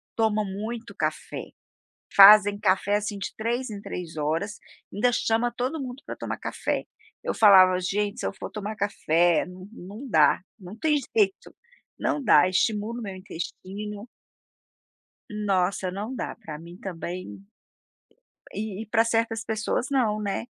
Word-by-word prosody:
toma 215 -1 +2
muito 220 +4 -6
café, - - -3 0.7
fazem 205 0 +9
café, 200 0 +2
assim, 205 0 -2
de - - -3
3 235 +3 -2
em 205 -1 -7
3 170 -5 -7
horas, 165 +8 -1 0.4
ainda 245 +5 +2
chama 230 +1 +1
todo 270 +5 -2
mundo 255 +1 -7
para - - -6
tomar - - -5
café. - - -2 0.4
Eu - - -1
falava: 185 -4 +7
"Gente, 205 +5 -1
se - - -4
eu - - -4
for - - -7
tomar 210 0 -5
café 175 -5 +2
não 185 +1 -11
não 220 +6 -9
dá, 155 -3 +4 0.2
não 190 +4 -10
tem 300 +4 +2 0.2
jeito, 200 -3 +1 0.5
não 290 - -1
dá 150 -6 +6
estimula 215 +4 0
o - - -6
meu 195 -2 -6
intestino". 200 +4 -7 1.2
Nossa, 195 -3 0
não 210 +7 -5
dá, - - -4
para 160 -9 -8
mim 170 +2 -11
também, 185 0 -6 1.1
e 210 -1 -4
e - - -12
para 225 +2 +3
certas 225 -1 0
pessoas 220 +3 -1
nã, 260 -5 +3
né? 205 +3 -2
205 Hz, 150 wpm, -26 LUFS, 185-225 Hz, 1.2 s, fazem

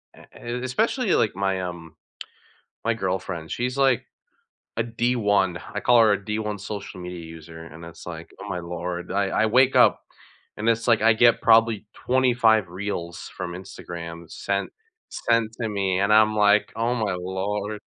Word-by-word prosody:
a - - -16
and 125 +2 -4
especially 220 - 0
like 105 - +1
my, 95 -1 0
um, 85 -3 -7 0.9
my 115 - +2
girlfriend, 90 -5 -3
she's 125 +2 -2
like, 135 -3 +3 0.7
a 115 - +2
D1. 110 -6 +1 0.2
I - - 0
call 120 -1 +5
her 110 -2 +5
a 100 - -1
D1 105 -1 -3
social 100 -2 -7
media 90 0 -7
user 80 0 -11
and 85 +1 -11
it's, 85 - -12
like, 80 -1 -8
"Oh - - -7
my 90 - -3
lord." 85 +1 -5
I 100 0 +1
I - - +4
wake 130 +4 +4
up - - +5 0.6
and 110 +2 -3
it's 115 +1 0
like, 115 -2 +4 0.2
get 120 -1 +5
probably 115 -2 +4
25 120 -6 +2
reels 90 -2 -5
from 90 -2 -4
Instagram 85 -2 -8
sent 100 0 -2 0.4
sent 115 -2 +1
to 115 - -1
me, 95 -2 0
and 100 - +2
I'm 110 0 +5
like, 105 0 +4
"Oh 115 +2 0
my 105 -5 -1
lord." 100 +3 -3
100 Hz, 165 wpm, -24 LUFS, 90-115 Hz, 0.9 s, call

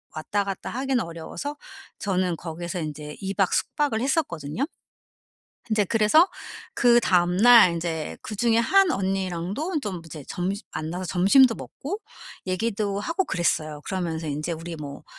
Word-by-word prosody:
왔다 200 +6 -1
갔다 195 -1 -5
하기는 265 0 0
어려워서 170 - -6 0.4
저는 185 -3 0
거기에서 175 +2 -5
인제 150 -1 -6
2 195 0 -3
박 195 -2 +2
숙박을 280 -7 0
했었거든요. 250 - -1 1.1
인제 215 -2 +3
그래서 225 - +5 0.5
그 240 -1 +5
다음날 185 +3 +6
인제 165 -2 -3
그중에 225 +2 +1
한 385 +10 +4
언니랑도 195 - -2
좀 185 -5 -4
이제 155 -3 -9
점시 195 +3 -2
만나서 170 +4 -4
점심도 225 +8 +5
먹고 390 +10 -6 0.5
얘기도 200 +1 -1
하고 340 - -1
그랬어요. 155 - -1
그러면서 170 -4 -3
인제 150 +4 -2
우리 165 +1 -6
뭐, 145 -2 -8
190 Hz, 310 characters per minute, -25 LUFS, 170-230 Hz, 1.1 s, 다음날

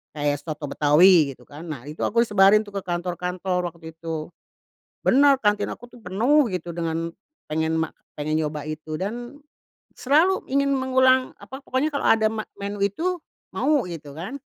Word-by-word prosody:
Kayak 145 -1 0
soto 155 -2 -5
betawi 150 -1 +5
gitu 125 - -20
kan, 150 +6 -11
nah 140 -6 -6
itu 150 +2 -10
aku 235 +2 +2
sebarin 205 0 +5
itu 205 - -13
ke 200 - -3
kantor-kantor 180 0 -2
waktu 165 -1 -10
itu. 160 0 -6 0.7
Benar, 275 +1 +5
kantin 210 -3 +1
aku 240 - -8
tuh 245 -1 -17
penuh 235 +9 +2
gitu 175 -2 -4
dengan 165 0 -3 0.3
pengen 160 +1 -1
ma 160 - -2 0.2
pengen 155 +2 0
nyoba 150 -1 -4
itu 155 0 -5
dan, 240 +8 -5 0.6
selalu 320 +8 +2
ingin 280 0 +2
mengulang, 260 0 +3
apa, 265 +1 -10
pokoknya 265 +4 0
kalau 280 - -2
ada 220 -1 +4
me 215 0 -3 0.2
menu 200 0 -5
itu, 335 - 0 0.4
mau 290 -5 +2
gitu 150 -4 -8
kan. 225 +12 -6
185 Hz, 165 wpm, -24 LUFS, 160-245 Hz, 0.7 s, betawi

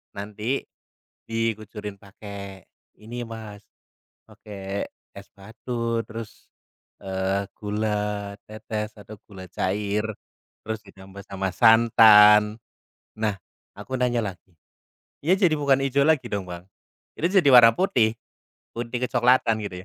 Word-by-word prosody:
nanti, 105 +6 -4 0.6
dikucurin 110 -2 -3
pakai 100 -1 -10 0.4
ini 120 +2 -6
Mas, 110 -2 -9 0.7
pakai 100 -1 -6 0.3
es - - -10
batu 115 +3 -4
terus, 110 0 -9 0.6
eee, 95 +1 -2
gula 105 -1 -2
tetes 110 0 -5
atau 105 +2 -11
gula 95 -2 -10
cair, 105 +2 -1 0.6
terus 110 0 -4
ditambah 95 0 -13
sama 95 -1 -3
santan." 110 -2 +6 0.6
Nah 110 -2 0 0.4
aku 130 0 -5
nanya 120 -1 +1
lagi, 90 -2 -9 0.7
"Ya 180 +4 +4
jadi 180 -6 +3
bukan 140 -2 +3
hijau 140 +1 +2
lagi 160 -4 +2
dong 100 -2 -3
Bang? 90 +1 -8 0.5
Itu 170 - 0
jadi 185 -7 +4
warna 115 -2 +9
putih, 115 - +1 0.6
putih 120 +1 -4
kecoklatan 120 -3 +2
gitu 90 -2 -7
105 Hz, 110 wpm, -24 LUFS, 100-115 Hz, 0.7 s, warna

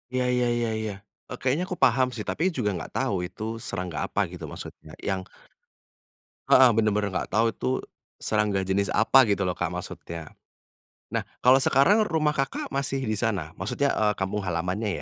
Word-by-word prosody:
Iya 130 0 0
iya 125 0 +2
iya 120 -1 0
iya. 110 -2 -3 0.4
Eee, 125 - -5
kayaknya 135 +7 +1
aku 180 -1 -5
paham 130 -1 +4
sih, 115 -4 -6
tapi 180 +4 0
juga 125 -10 -1
nggak - - -6
tahu, 90 -3 0
itu 95 +4 -9 0.2
serangga 90 -5 -3
apa - - -3
gitu, - - -9
maksudnya - - -10
yang 95 -1 -2 1.3
heeh, 130 0 +8
bener-bener 105 -2 +2
nggak - - -2
tahu 110 +3 +3
itu - - -6 0.5
serangga 105 -3 0
jenis 95 +1 0
apa 110 +5 +4
gitu 100 -1 +1
loh 90 - 0
Kak 90 - +1
maksudnya. 85 -2 -7 0.8
Nah, - - 0 0.2
kalau 130 +2 +7
sekarang 205 +12 +4
rumah 155 -2 +1
Kakak 135 -2 -3
masih 135 -1 -1
di 110 - -1
sana? 95 -9 -1
Maksudnya, 140 +9 0
eee, 105 -1 +2
kampung 95 +2 -2
halamannya 90 +5 -1
110 Hz, 170 wpm, -26 LUFS, 95-130 Hz, 1.3 s, heeh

